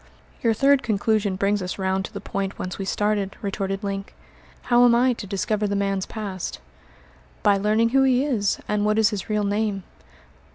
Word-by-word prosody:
"Your 230 -2 +2
third 275 +3 +4
conclusion 210 -2 0
brings 200 +2 +1
us 180 0 -4
round 190 0 -1
to - - -9
the 200 - -6
point 195 -1 -4
whence 185 +1 -5
we 195 - -3
started," 205 -1 -1
retorted 195 0 -3
Link. 195 0 -4 0.5
"How 245 0 +4
am 240 -1 +6
I 250 +1 +3
to 215 -3 -8
discover 210 +2 -1
the 200 - -1
man's 195 -1 -1
past?" 195 -5 -5 0.8
"By 205 -2 +4
learning 215 +3 +2
who 270 +3 +3
he 265 0 +3
is, 220 -9 0
and 210 0 0
what 215 +1 +2
is 220 0 +4
his 205 0 -5
real 210 -1 +1
name." 205 -1 -1
205 Hz, 190 wpm, -23 LUFS, 195-220 Hz, 0.8 s, am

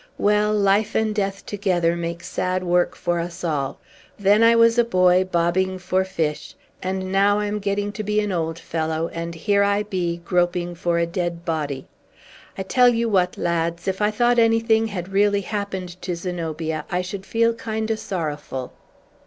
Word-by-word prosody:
well, 210 +1 +2
life 205 +1 +2
and 220 -1 +1
death 195 -2 -2
together 180 -4 0
make 170 0 -4
sad 185 +1 -2
work 175 0 +1
for 175 -1 -1
us 170 +2 -5
all! 145 -5 -2 0.4
Then 205 +2 +4
I 230 0 +6
was 230 +1 +5
a - - +6
boy, 185 -4 +4
bobbing 185 +1 0
for 185 +1 0
fish; 160 -6 -3 0.3
and 185 0 -3
now 200 +1 +3
I 210 - 0
am 210 0 -2
getting 205 0 -1
to 215 +1 -5
be 210 +1 +1
an 210 -1 -1
old 165 -2 -2
fellow, 160 0 -2
and 170 0 -5
here 200 +5 +1
I 200 +1 +2
be, 180 -4 -2
groping 175 -1 0
for 170 0 -1
a 170 - +2
dead 170 -1 -3
body! 145 -5 -2 0.7
I 190 - -2
tell 245 +6 +4
you 230 -1 +1
what, 185 -3 +1
lads; 170 +1 -1
if 190 +1 -1
I 210 - +3
thought 240 +2 +2
anything 225 -1 +3
had 185 -4 -5
really 200 +1 +2
happened 190 -3 -5
to 180 -2 -3
Zenobia, 165 -3 -3
I 180 -1 -1
should 190 +1 -6
feel 230 +3 +2
kind 220 -1 -3
o' - - +1
sorrowful." 150 - -4
185 Hz, 180 wpm, -22 LUFS, 170-210 Hz, 0.7 s, I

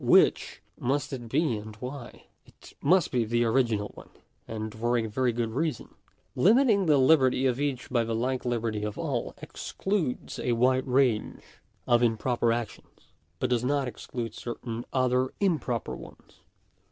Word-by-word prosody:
Which - - +3 0.2
must 140 +3 -1
it 120 -3 -6
be, 140 -3 +1
and 105 +1 -9
why? 125 +2 -8 0.2
It - - -17
must 175 +4 +3
be 125 -3 +2
the 120 +2 +1
original 115 -3 +1
one, - - -13 0.4
and 110 -1 -5
for 120 +2 0
a 115 - 0
very 120 +3 0
good 115 -1 -2
reason. 150 0 -2 0.4
Limiting 210 - +4
the 150 -2 +5
liberty 130 -2 +4
of 125 0 +1
each 140 -3 -2
by 120 -2 +2
the 115 0 -2
like 125 +3 -1
liberty 115 -3 -1
of 105 -1 -4
all, - - -3
excludes 190 -10 -3
a 120 - 0
wide 130 +3 +2
range 125 -4 +1 0.4
of 120 0 +4
improper 120 0 +1
actions, 115 -2 -6 0.2
but 125 +8 -1
does 120 -1 +2
not 140 +1 +1
exclude 115 -1 -5
certain 120 0 -6
other 130 0 +1
improper 150 - 0
ones. - - -14
125 Hz, 155 wpm, -28 LUFS, 115-135 Hz, 0.4 s, the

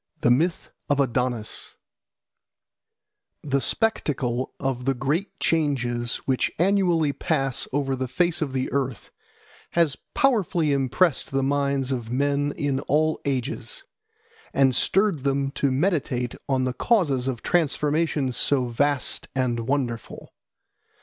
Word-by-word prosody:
The 120 - +4
Myth 165 +8 +1 0.2
of 145 -1 +2
Adonis 125 -4 -1 1.7
THE 140 -1 0
SPECTACLE 130 - 0
of 130 -2 -2
the 135 0 +1
great 150 +10 -2
changes 120 -7 0
which 130 -2 +1
annually 175 -5 +2
pass 135 -2 -1
over 135 -1 0
the 130 0 -3
face 170 +7 0
of 145 -3 -1
the 130 -1 -2
earth 130 -5 -2 0.6
has 165 -5 +2 0.2
powerfully 185 - +2
impressed 140 +4 +1
the 135 0 0
minds 140 -1 0
of 120 -4 -3
men 145 +2 +1
in 140 -2 0
all 155 +2 +2
ages, 135 +1 -3 0.7
and 135 -2 +4
stirred 190 -2 +2
them 140 0 0
to 140 0 0
meditate 135 -5 0 0.2
on 130 -1 +2
the 130 0 -1
causes 145 - +1
of 125 -4 -3
transformations 150 -4 +1
so 125 0 +1
vast 140 +3 0
and 120 -3 -1
wonderful. 130 -4 -3
140 Hz, 125 wpm, -24 LUFS, 130-155 Hz, 1.7 s, The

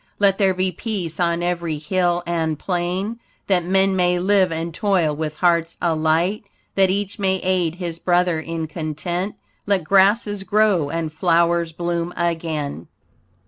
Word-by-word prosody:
Let 200 -1 +3
there 190 -2 +3
be 185 0 0
peace 185 -4 -4
on 170 -1 +1
every 170 -3 -1
hill 175 +2 0
and 165 -2 -1
plain, 185 +6 -2 0.3
That 185 -3 +2
men 190 +2 +2
may 180 -1 +2
live 190 0 +3
and 165 +1 -3
toil 180 -6 +1
with 155 0 -4
hearts 170 -1 +2
alight, 165 +4 +1 0.3
That 195 -1 +3
each 200 +2 -2
may 190 -1 +2
aid 180 -3 +1
his 170 -2 -5
brother 175 -2 +2
in 165 0 -4
content. 165 +5 -4 0.3
Let 200 -3 +2
grasses 200 +3 +3
grow 195 -5 +2
and 165 -1 -3
flowers 170 0 +2
bloom 170 +1 -3
again. 160 - -2
175 Hz, 145 wpm, -21 LUFS, 165-190 Hz, 0.3 s, Let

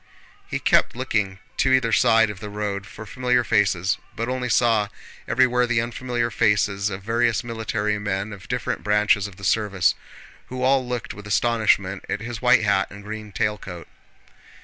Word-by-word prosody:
He - - -2
kept - - +2
looking 105 -7 -1 0.2
to 130 - +2
either 130 -3 +3
side 110 -1 +4
of 100 - -10
the 105 0 -7
road 100 -1 -4
for 110 - -10
familiar 125 +2 +1
faces, 95 -4 +1 0.2
but 115 +2 -3
only 125 -1 -2
saw 115 -3 +3 0.4
everywhere 125 0 +3
the 120 -1 +1
unfamiliar 120 0 -2
faces 105 -2 +1
of 95 -1 -6
various 115 +2 +1
military 110 -3 -2
men 100 +1 -3
of 100 +1 -12
different 125 -2 -3
branches 105 -1 +2
of 100 - -13
the 100 - -14
service, 100 -1 +2 0.5
who 130 0 -5
all 130 0 +3
looked 125 -1 -4
with 105 0 -11
astonishment 105 -3 +1
at 100 - -1
his 115 0 -6
white 120 -2 +5
hat 100 -2 +2
and 100 0 -11
green 105 0 -7
tail 105 +1 -1
coat. 90 -3 -9
110 Hz, 170 wpm, -23 LUFS, 100-120 Hz, 0.5 s, white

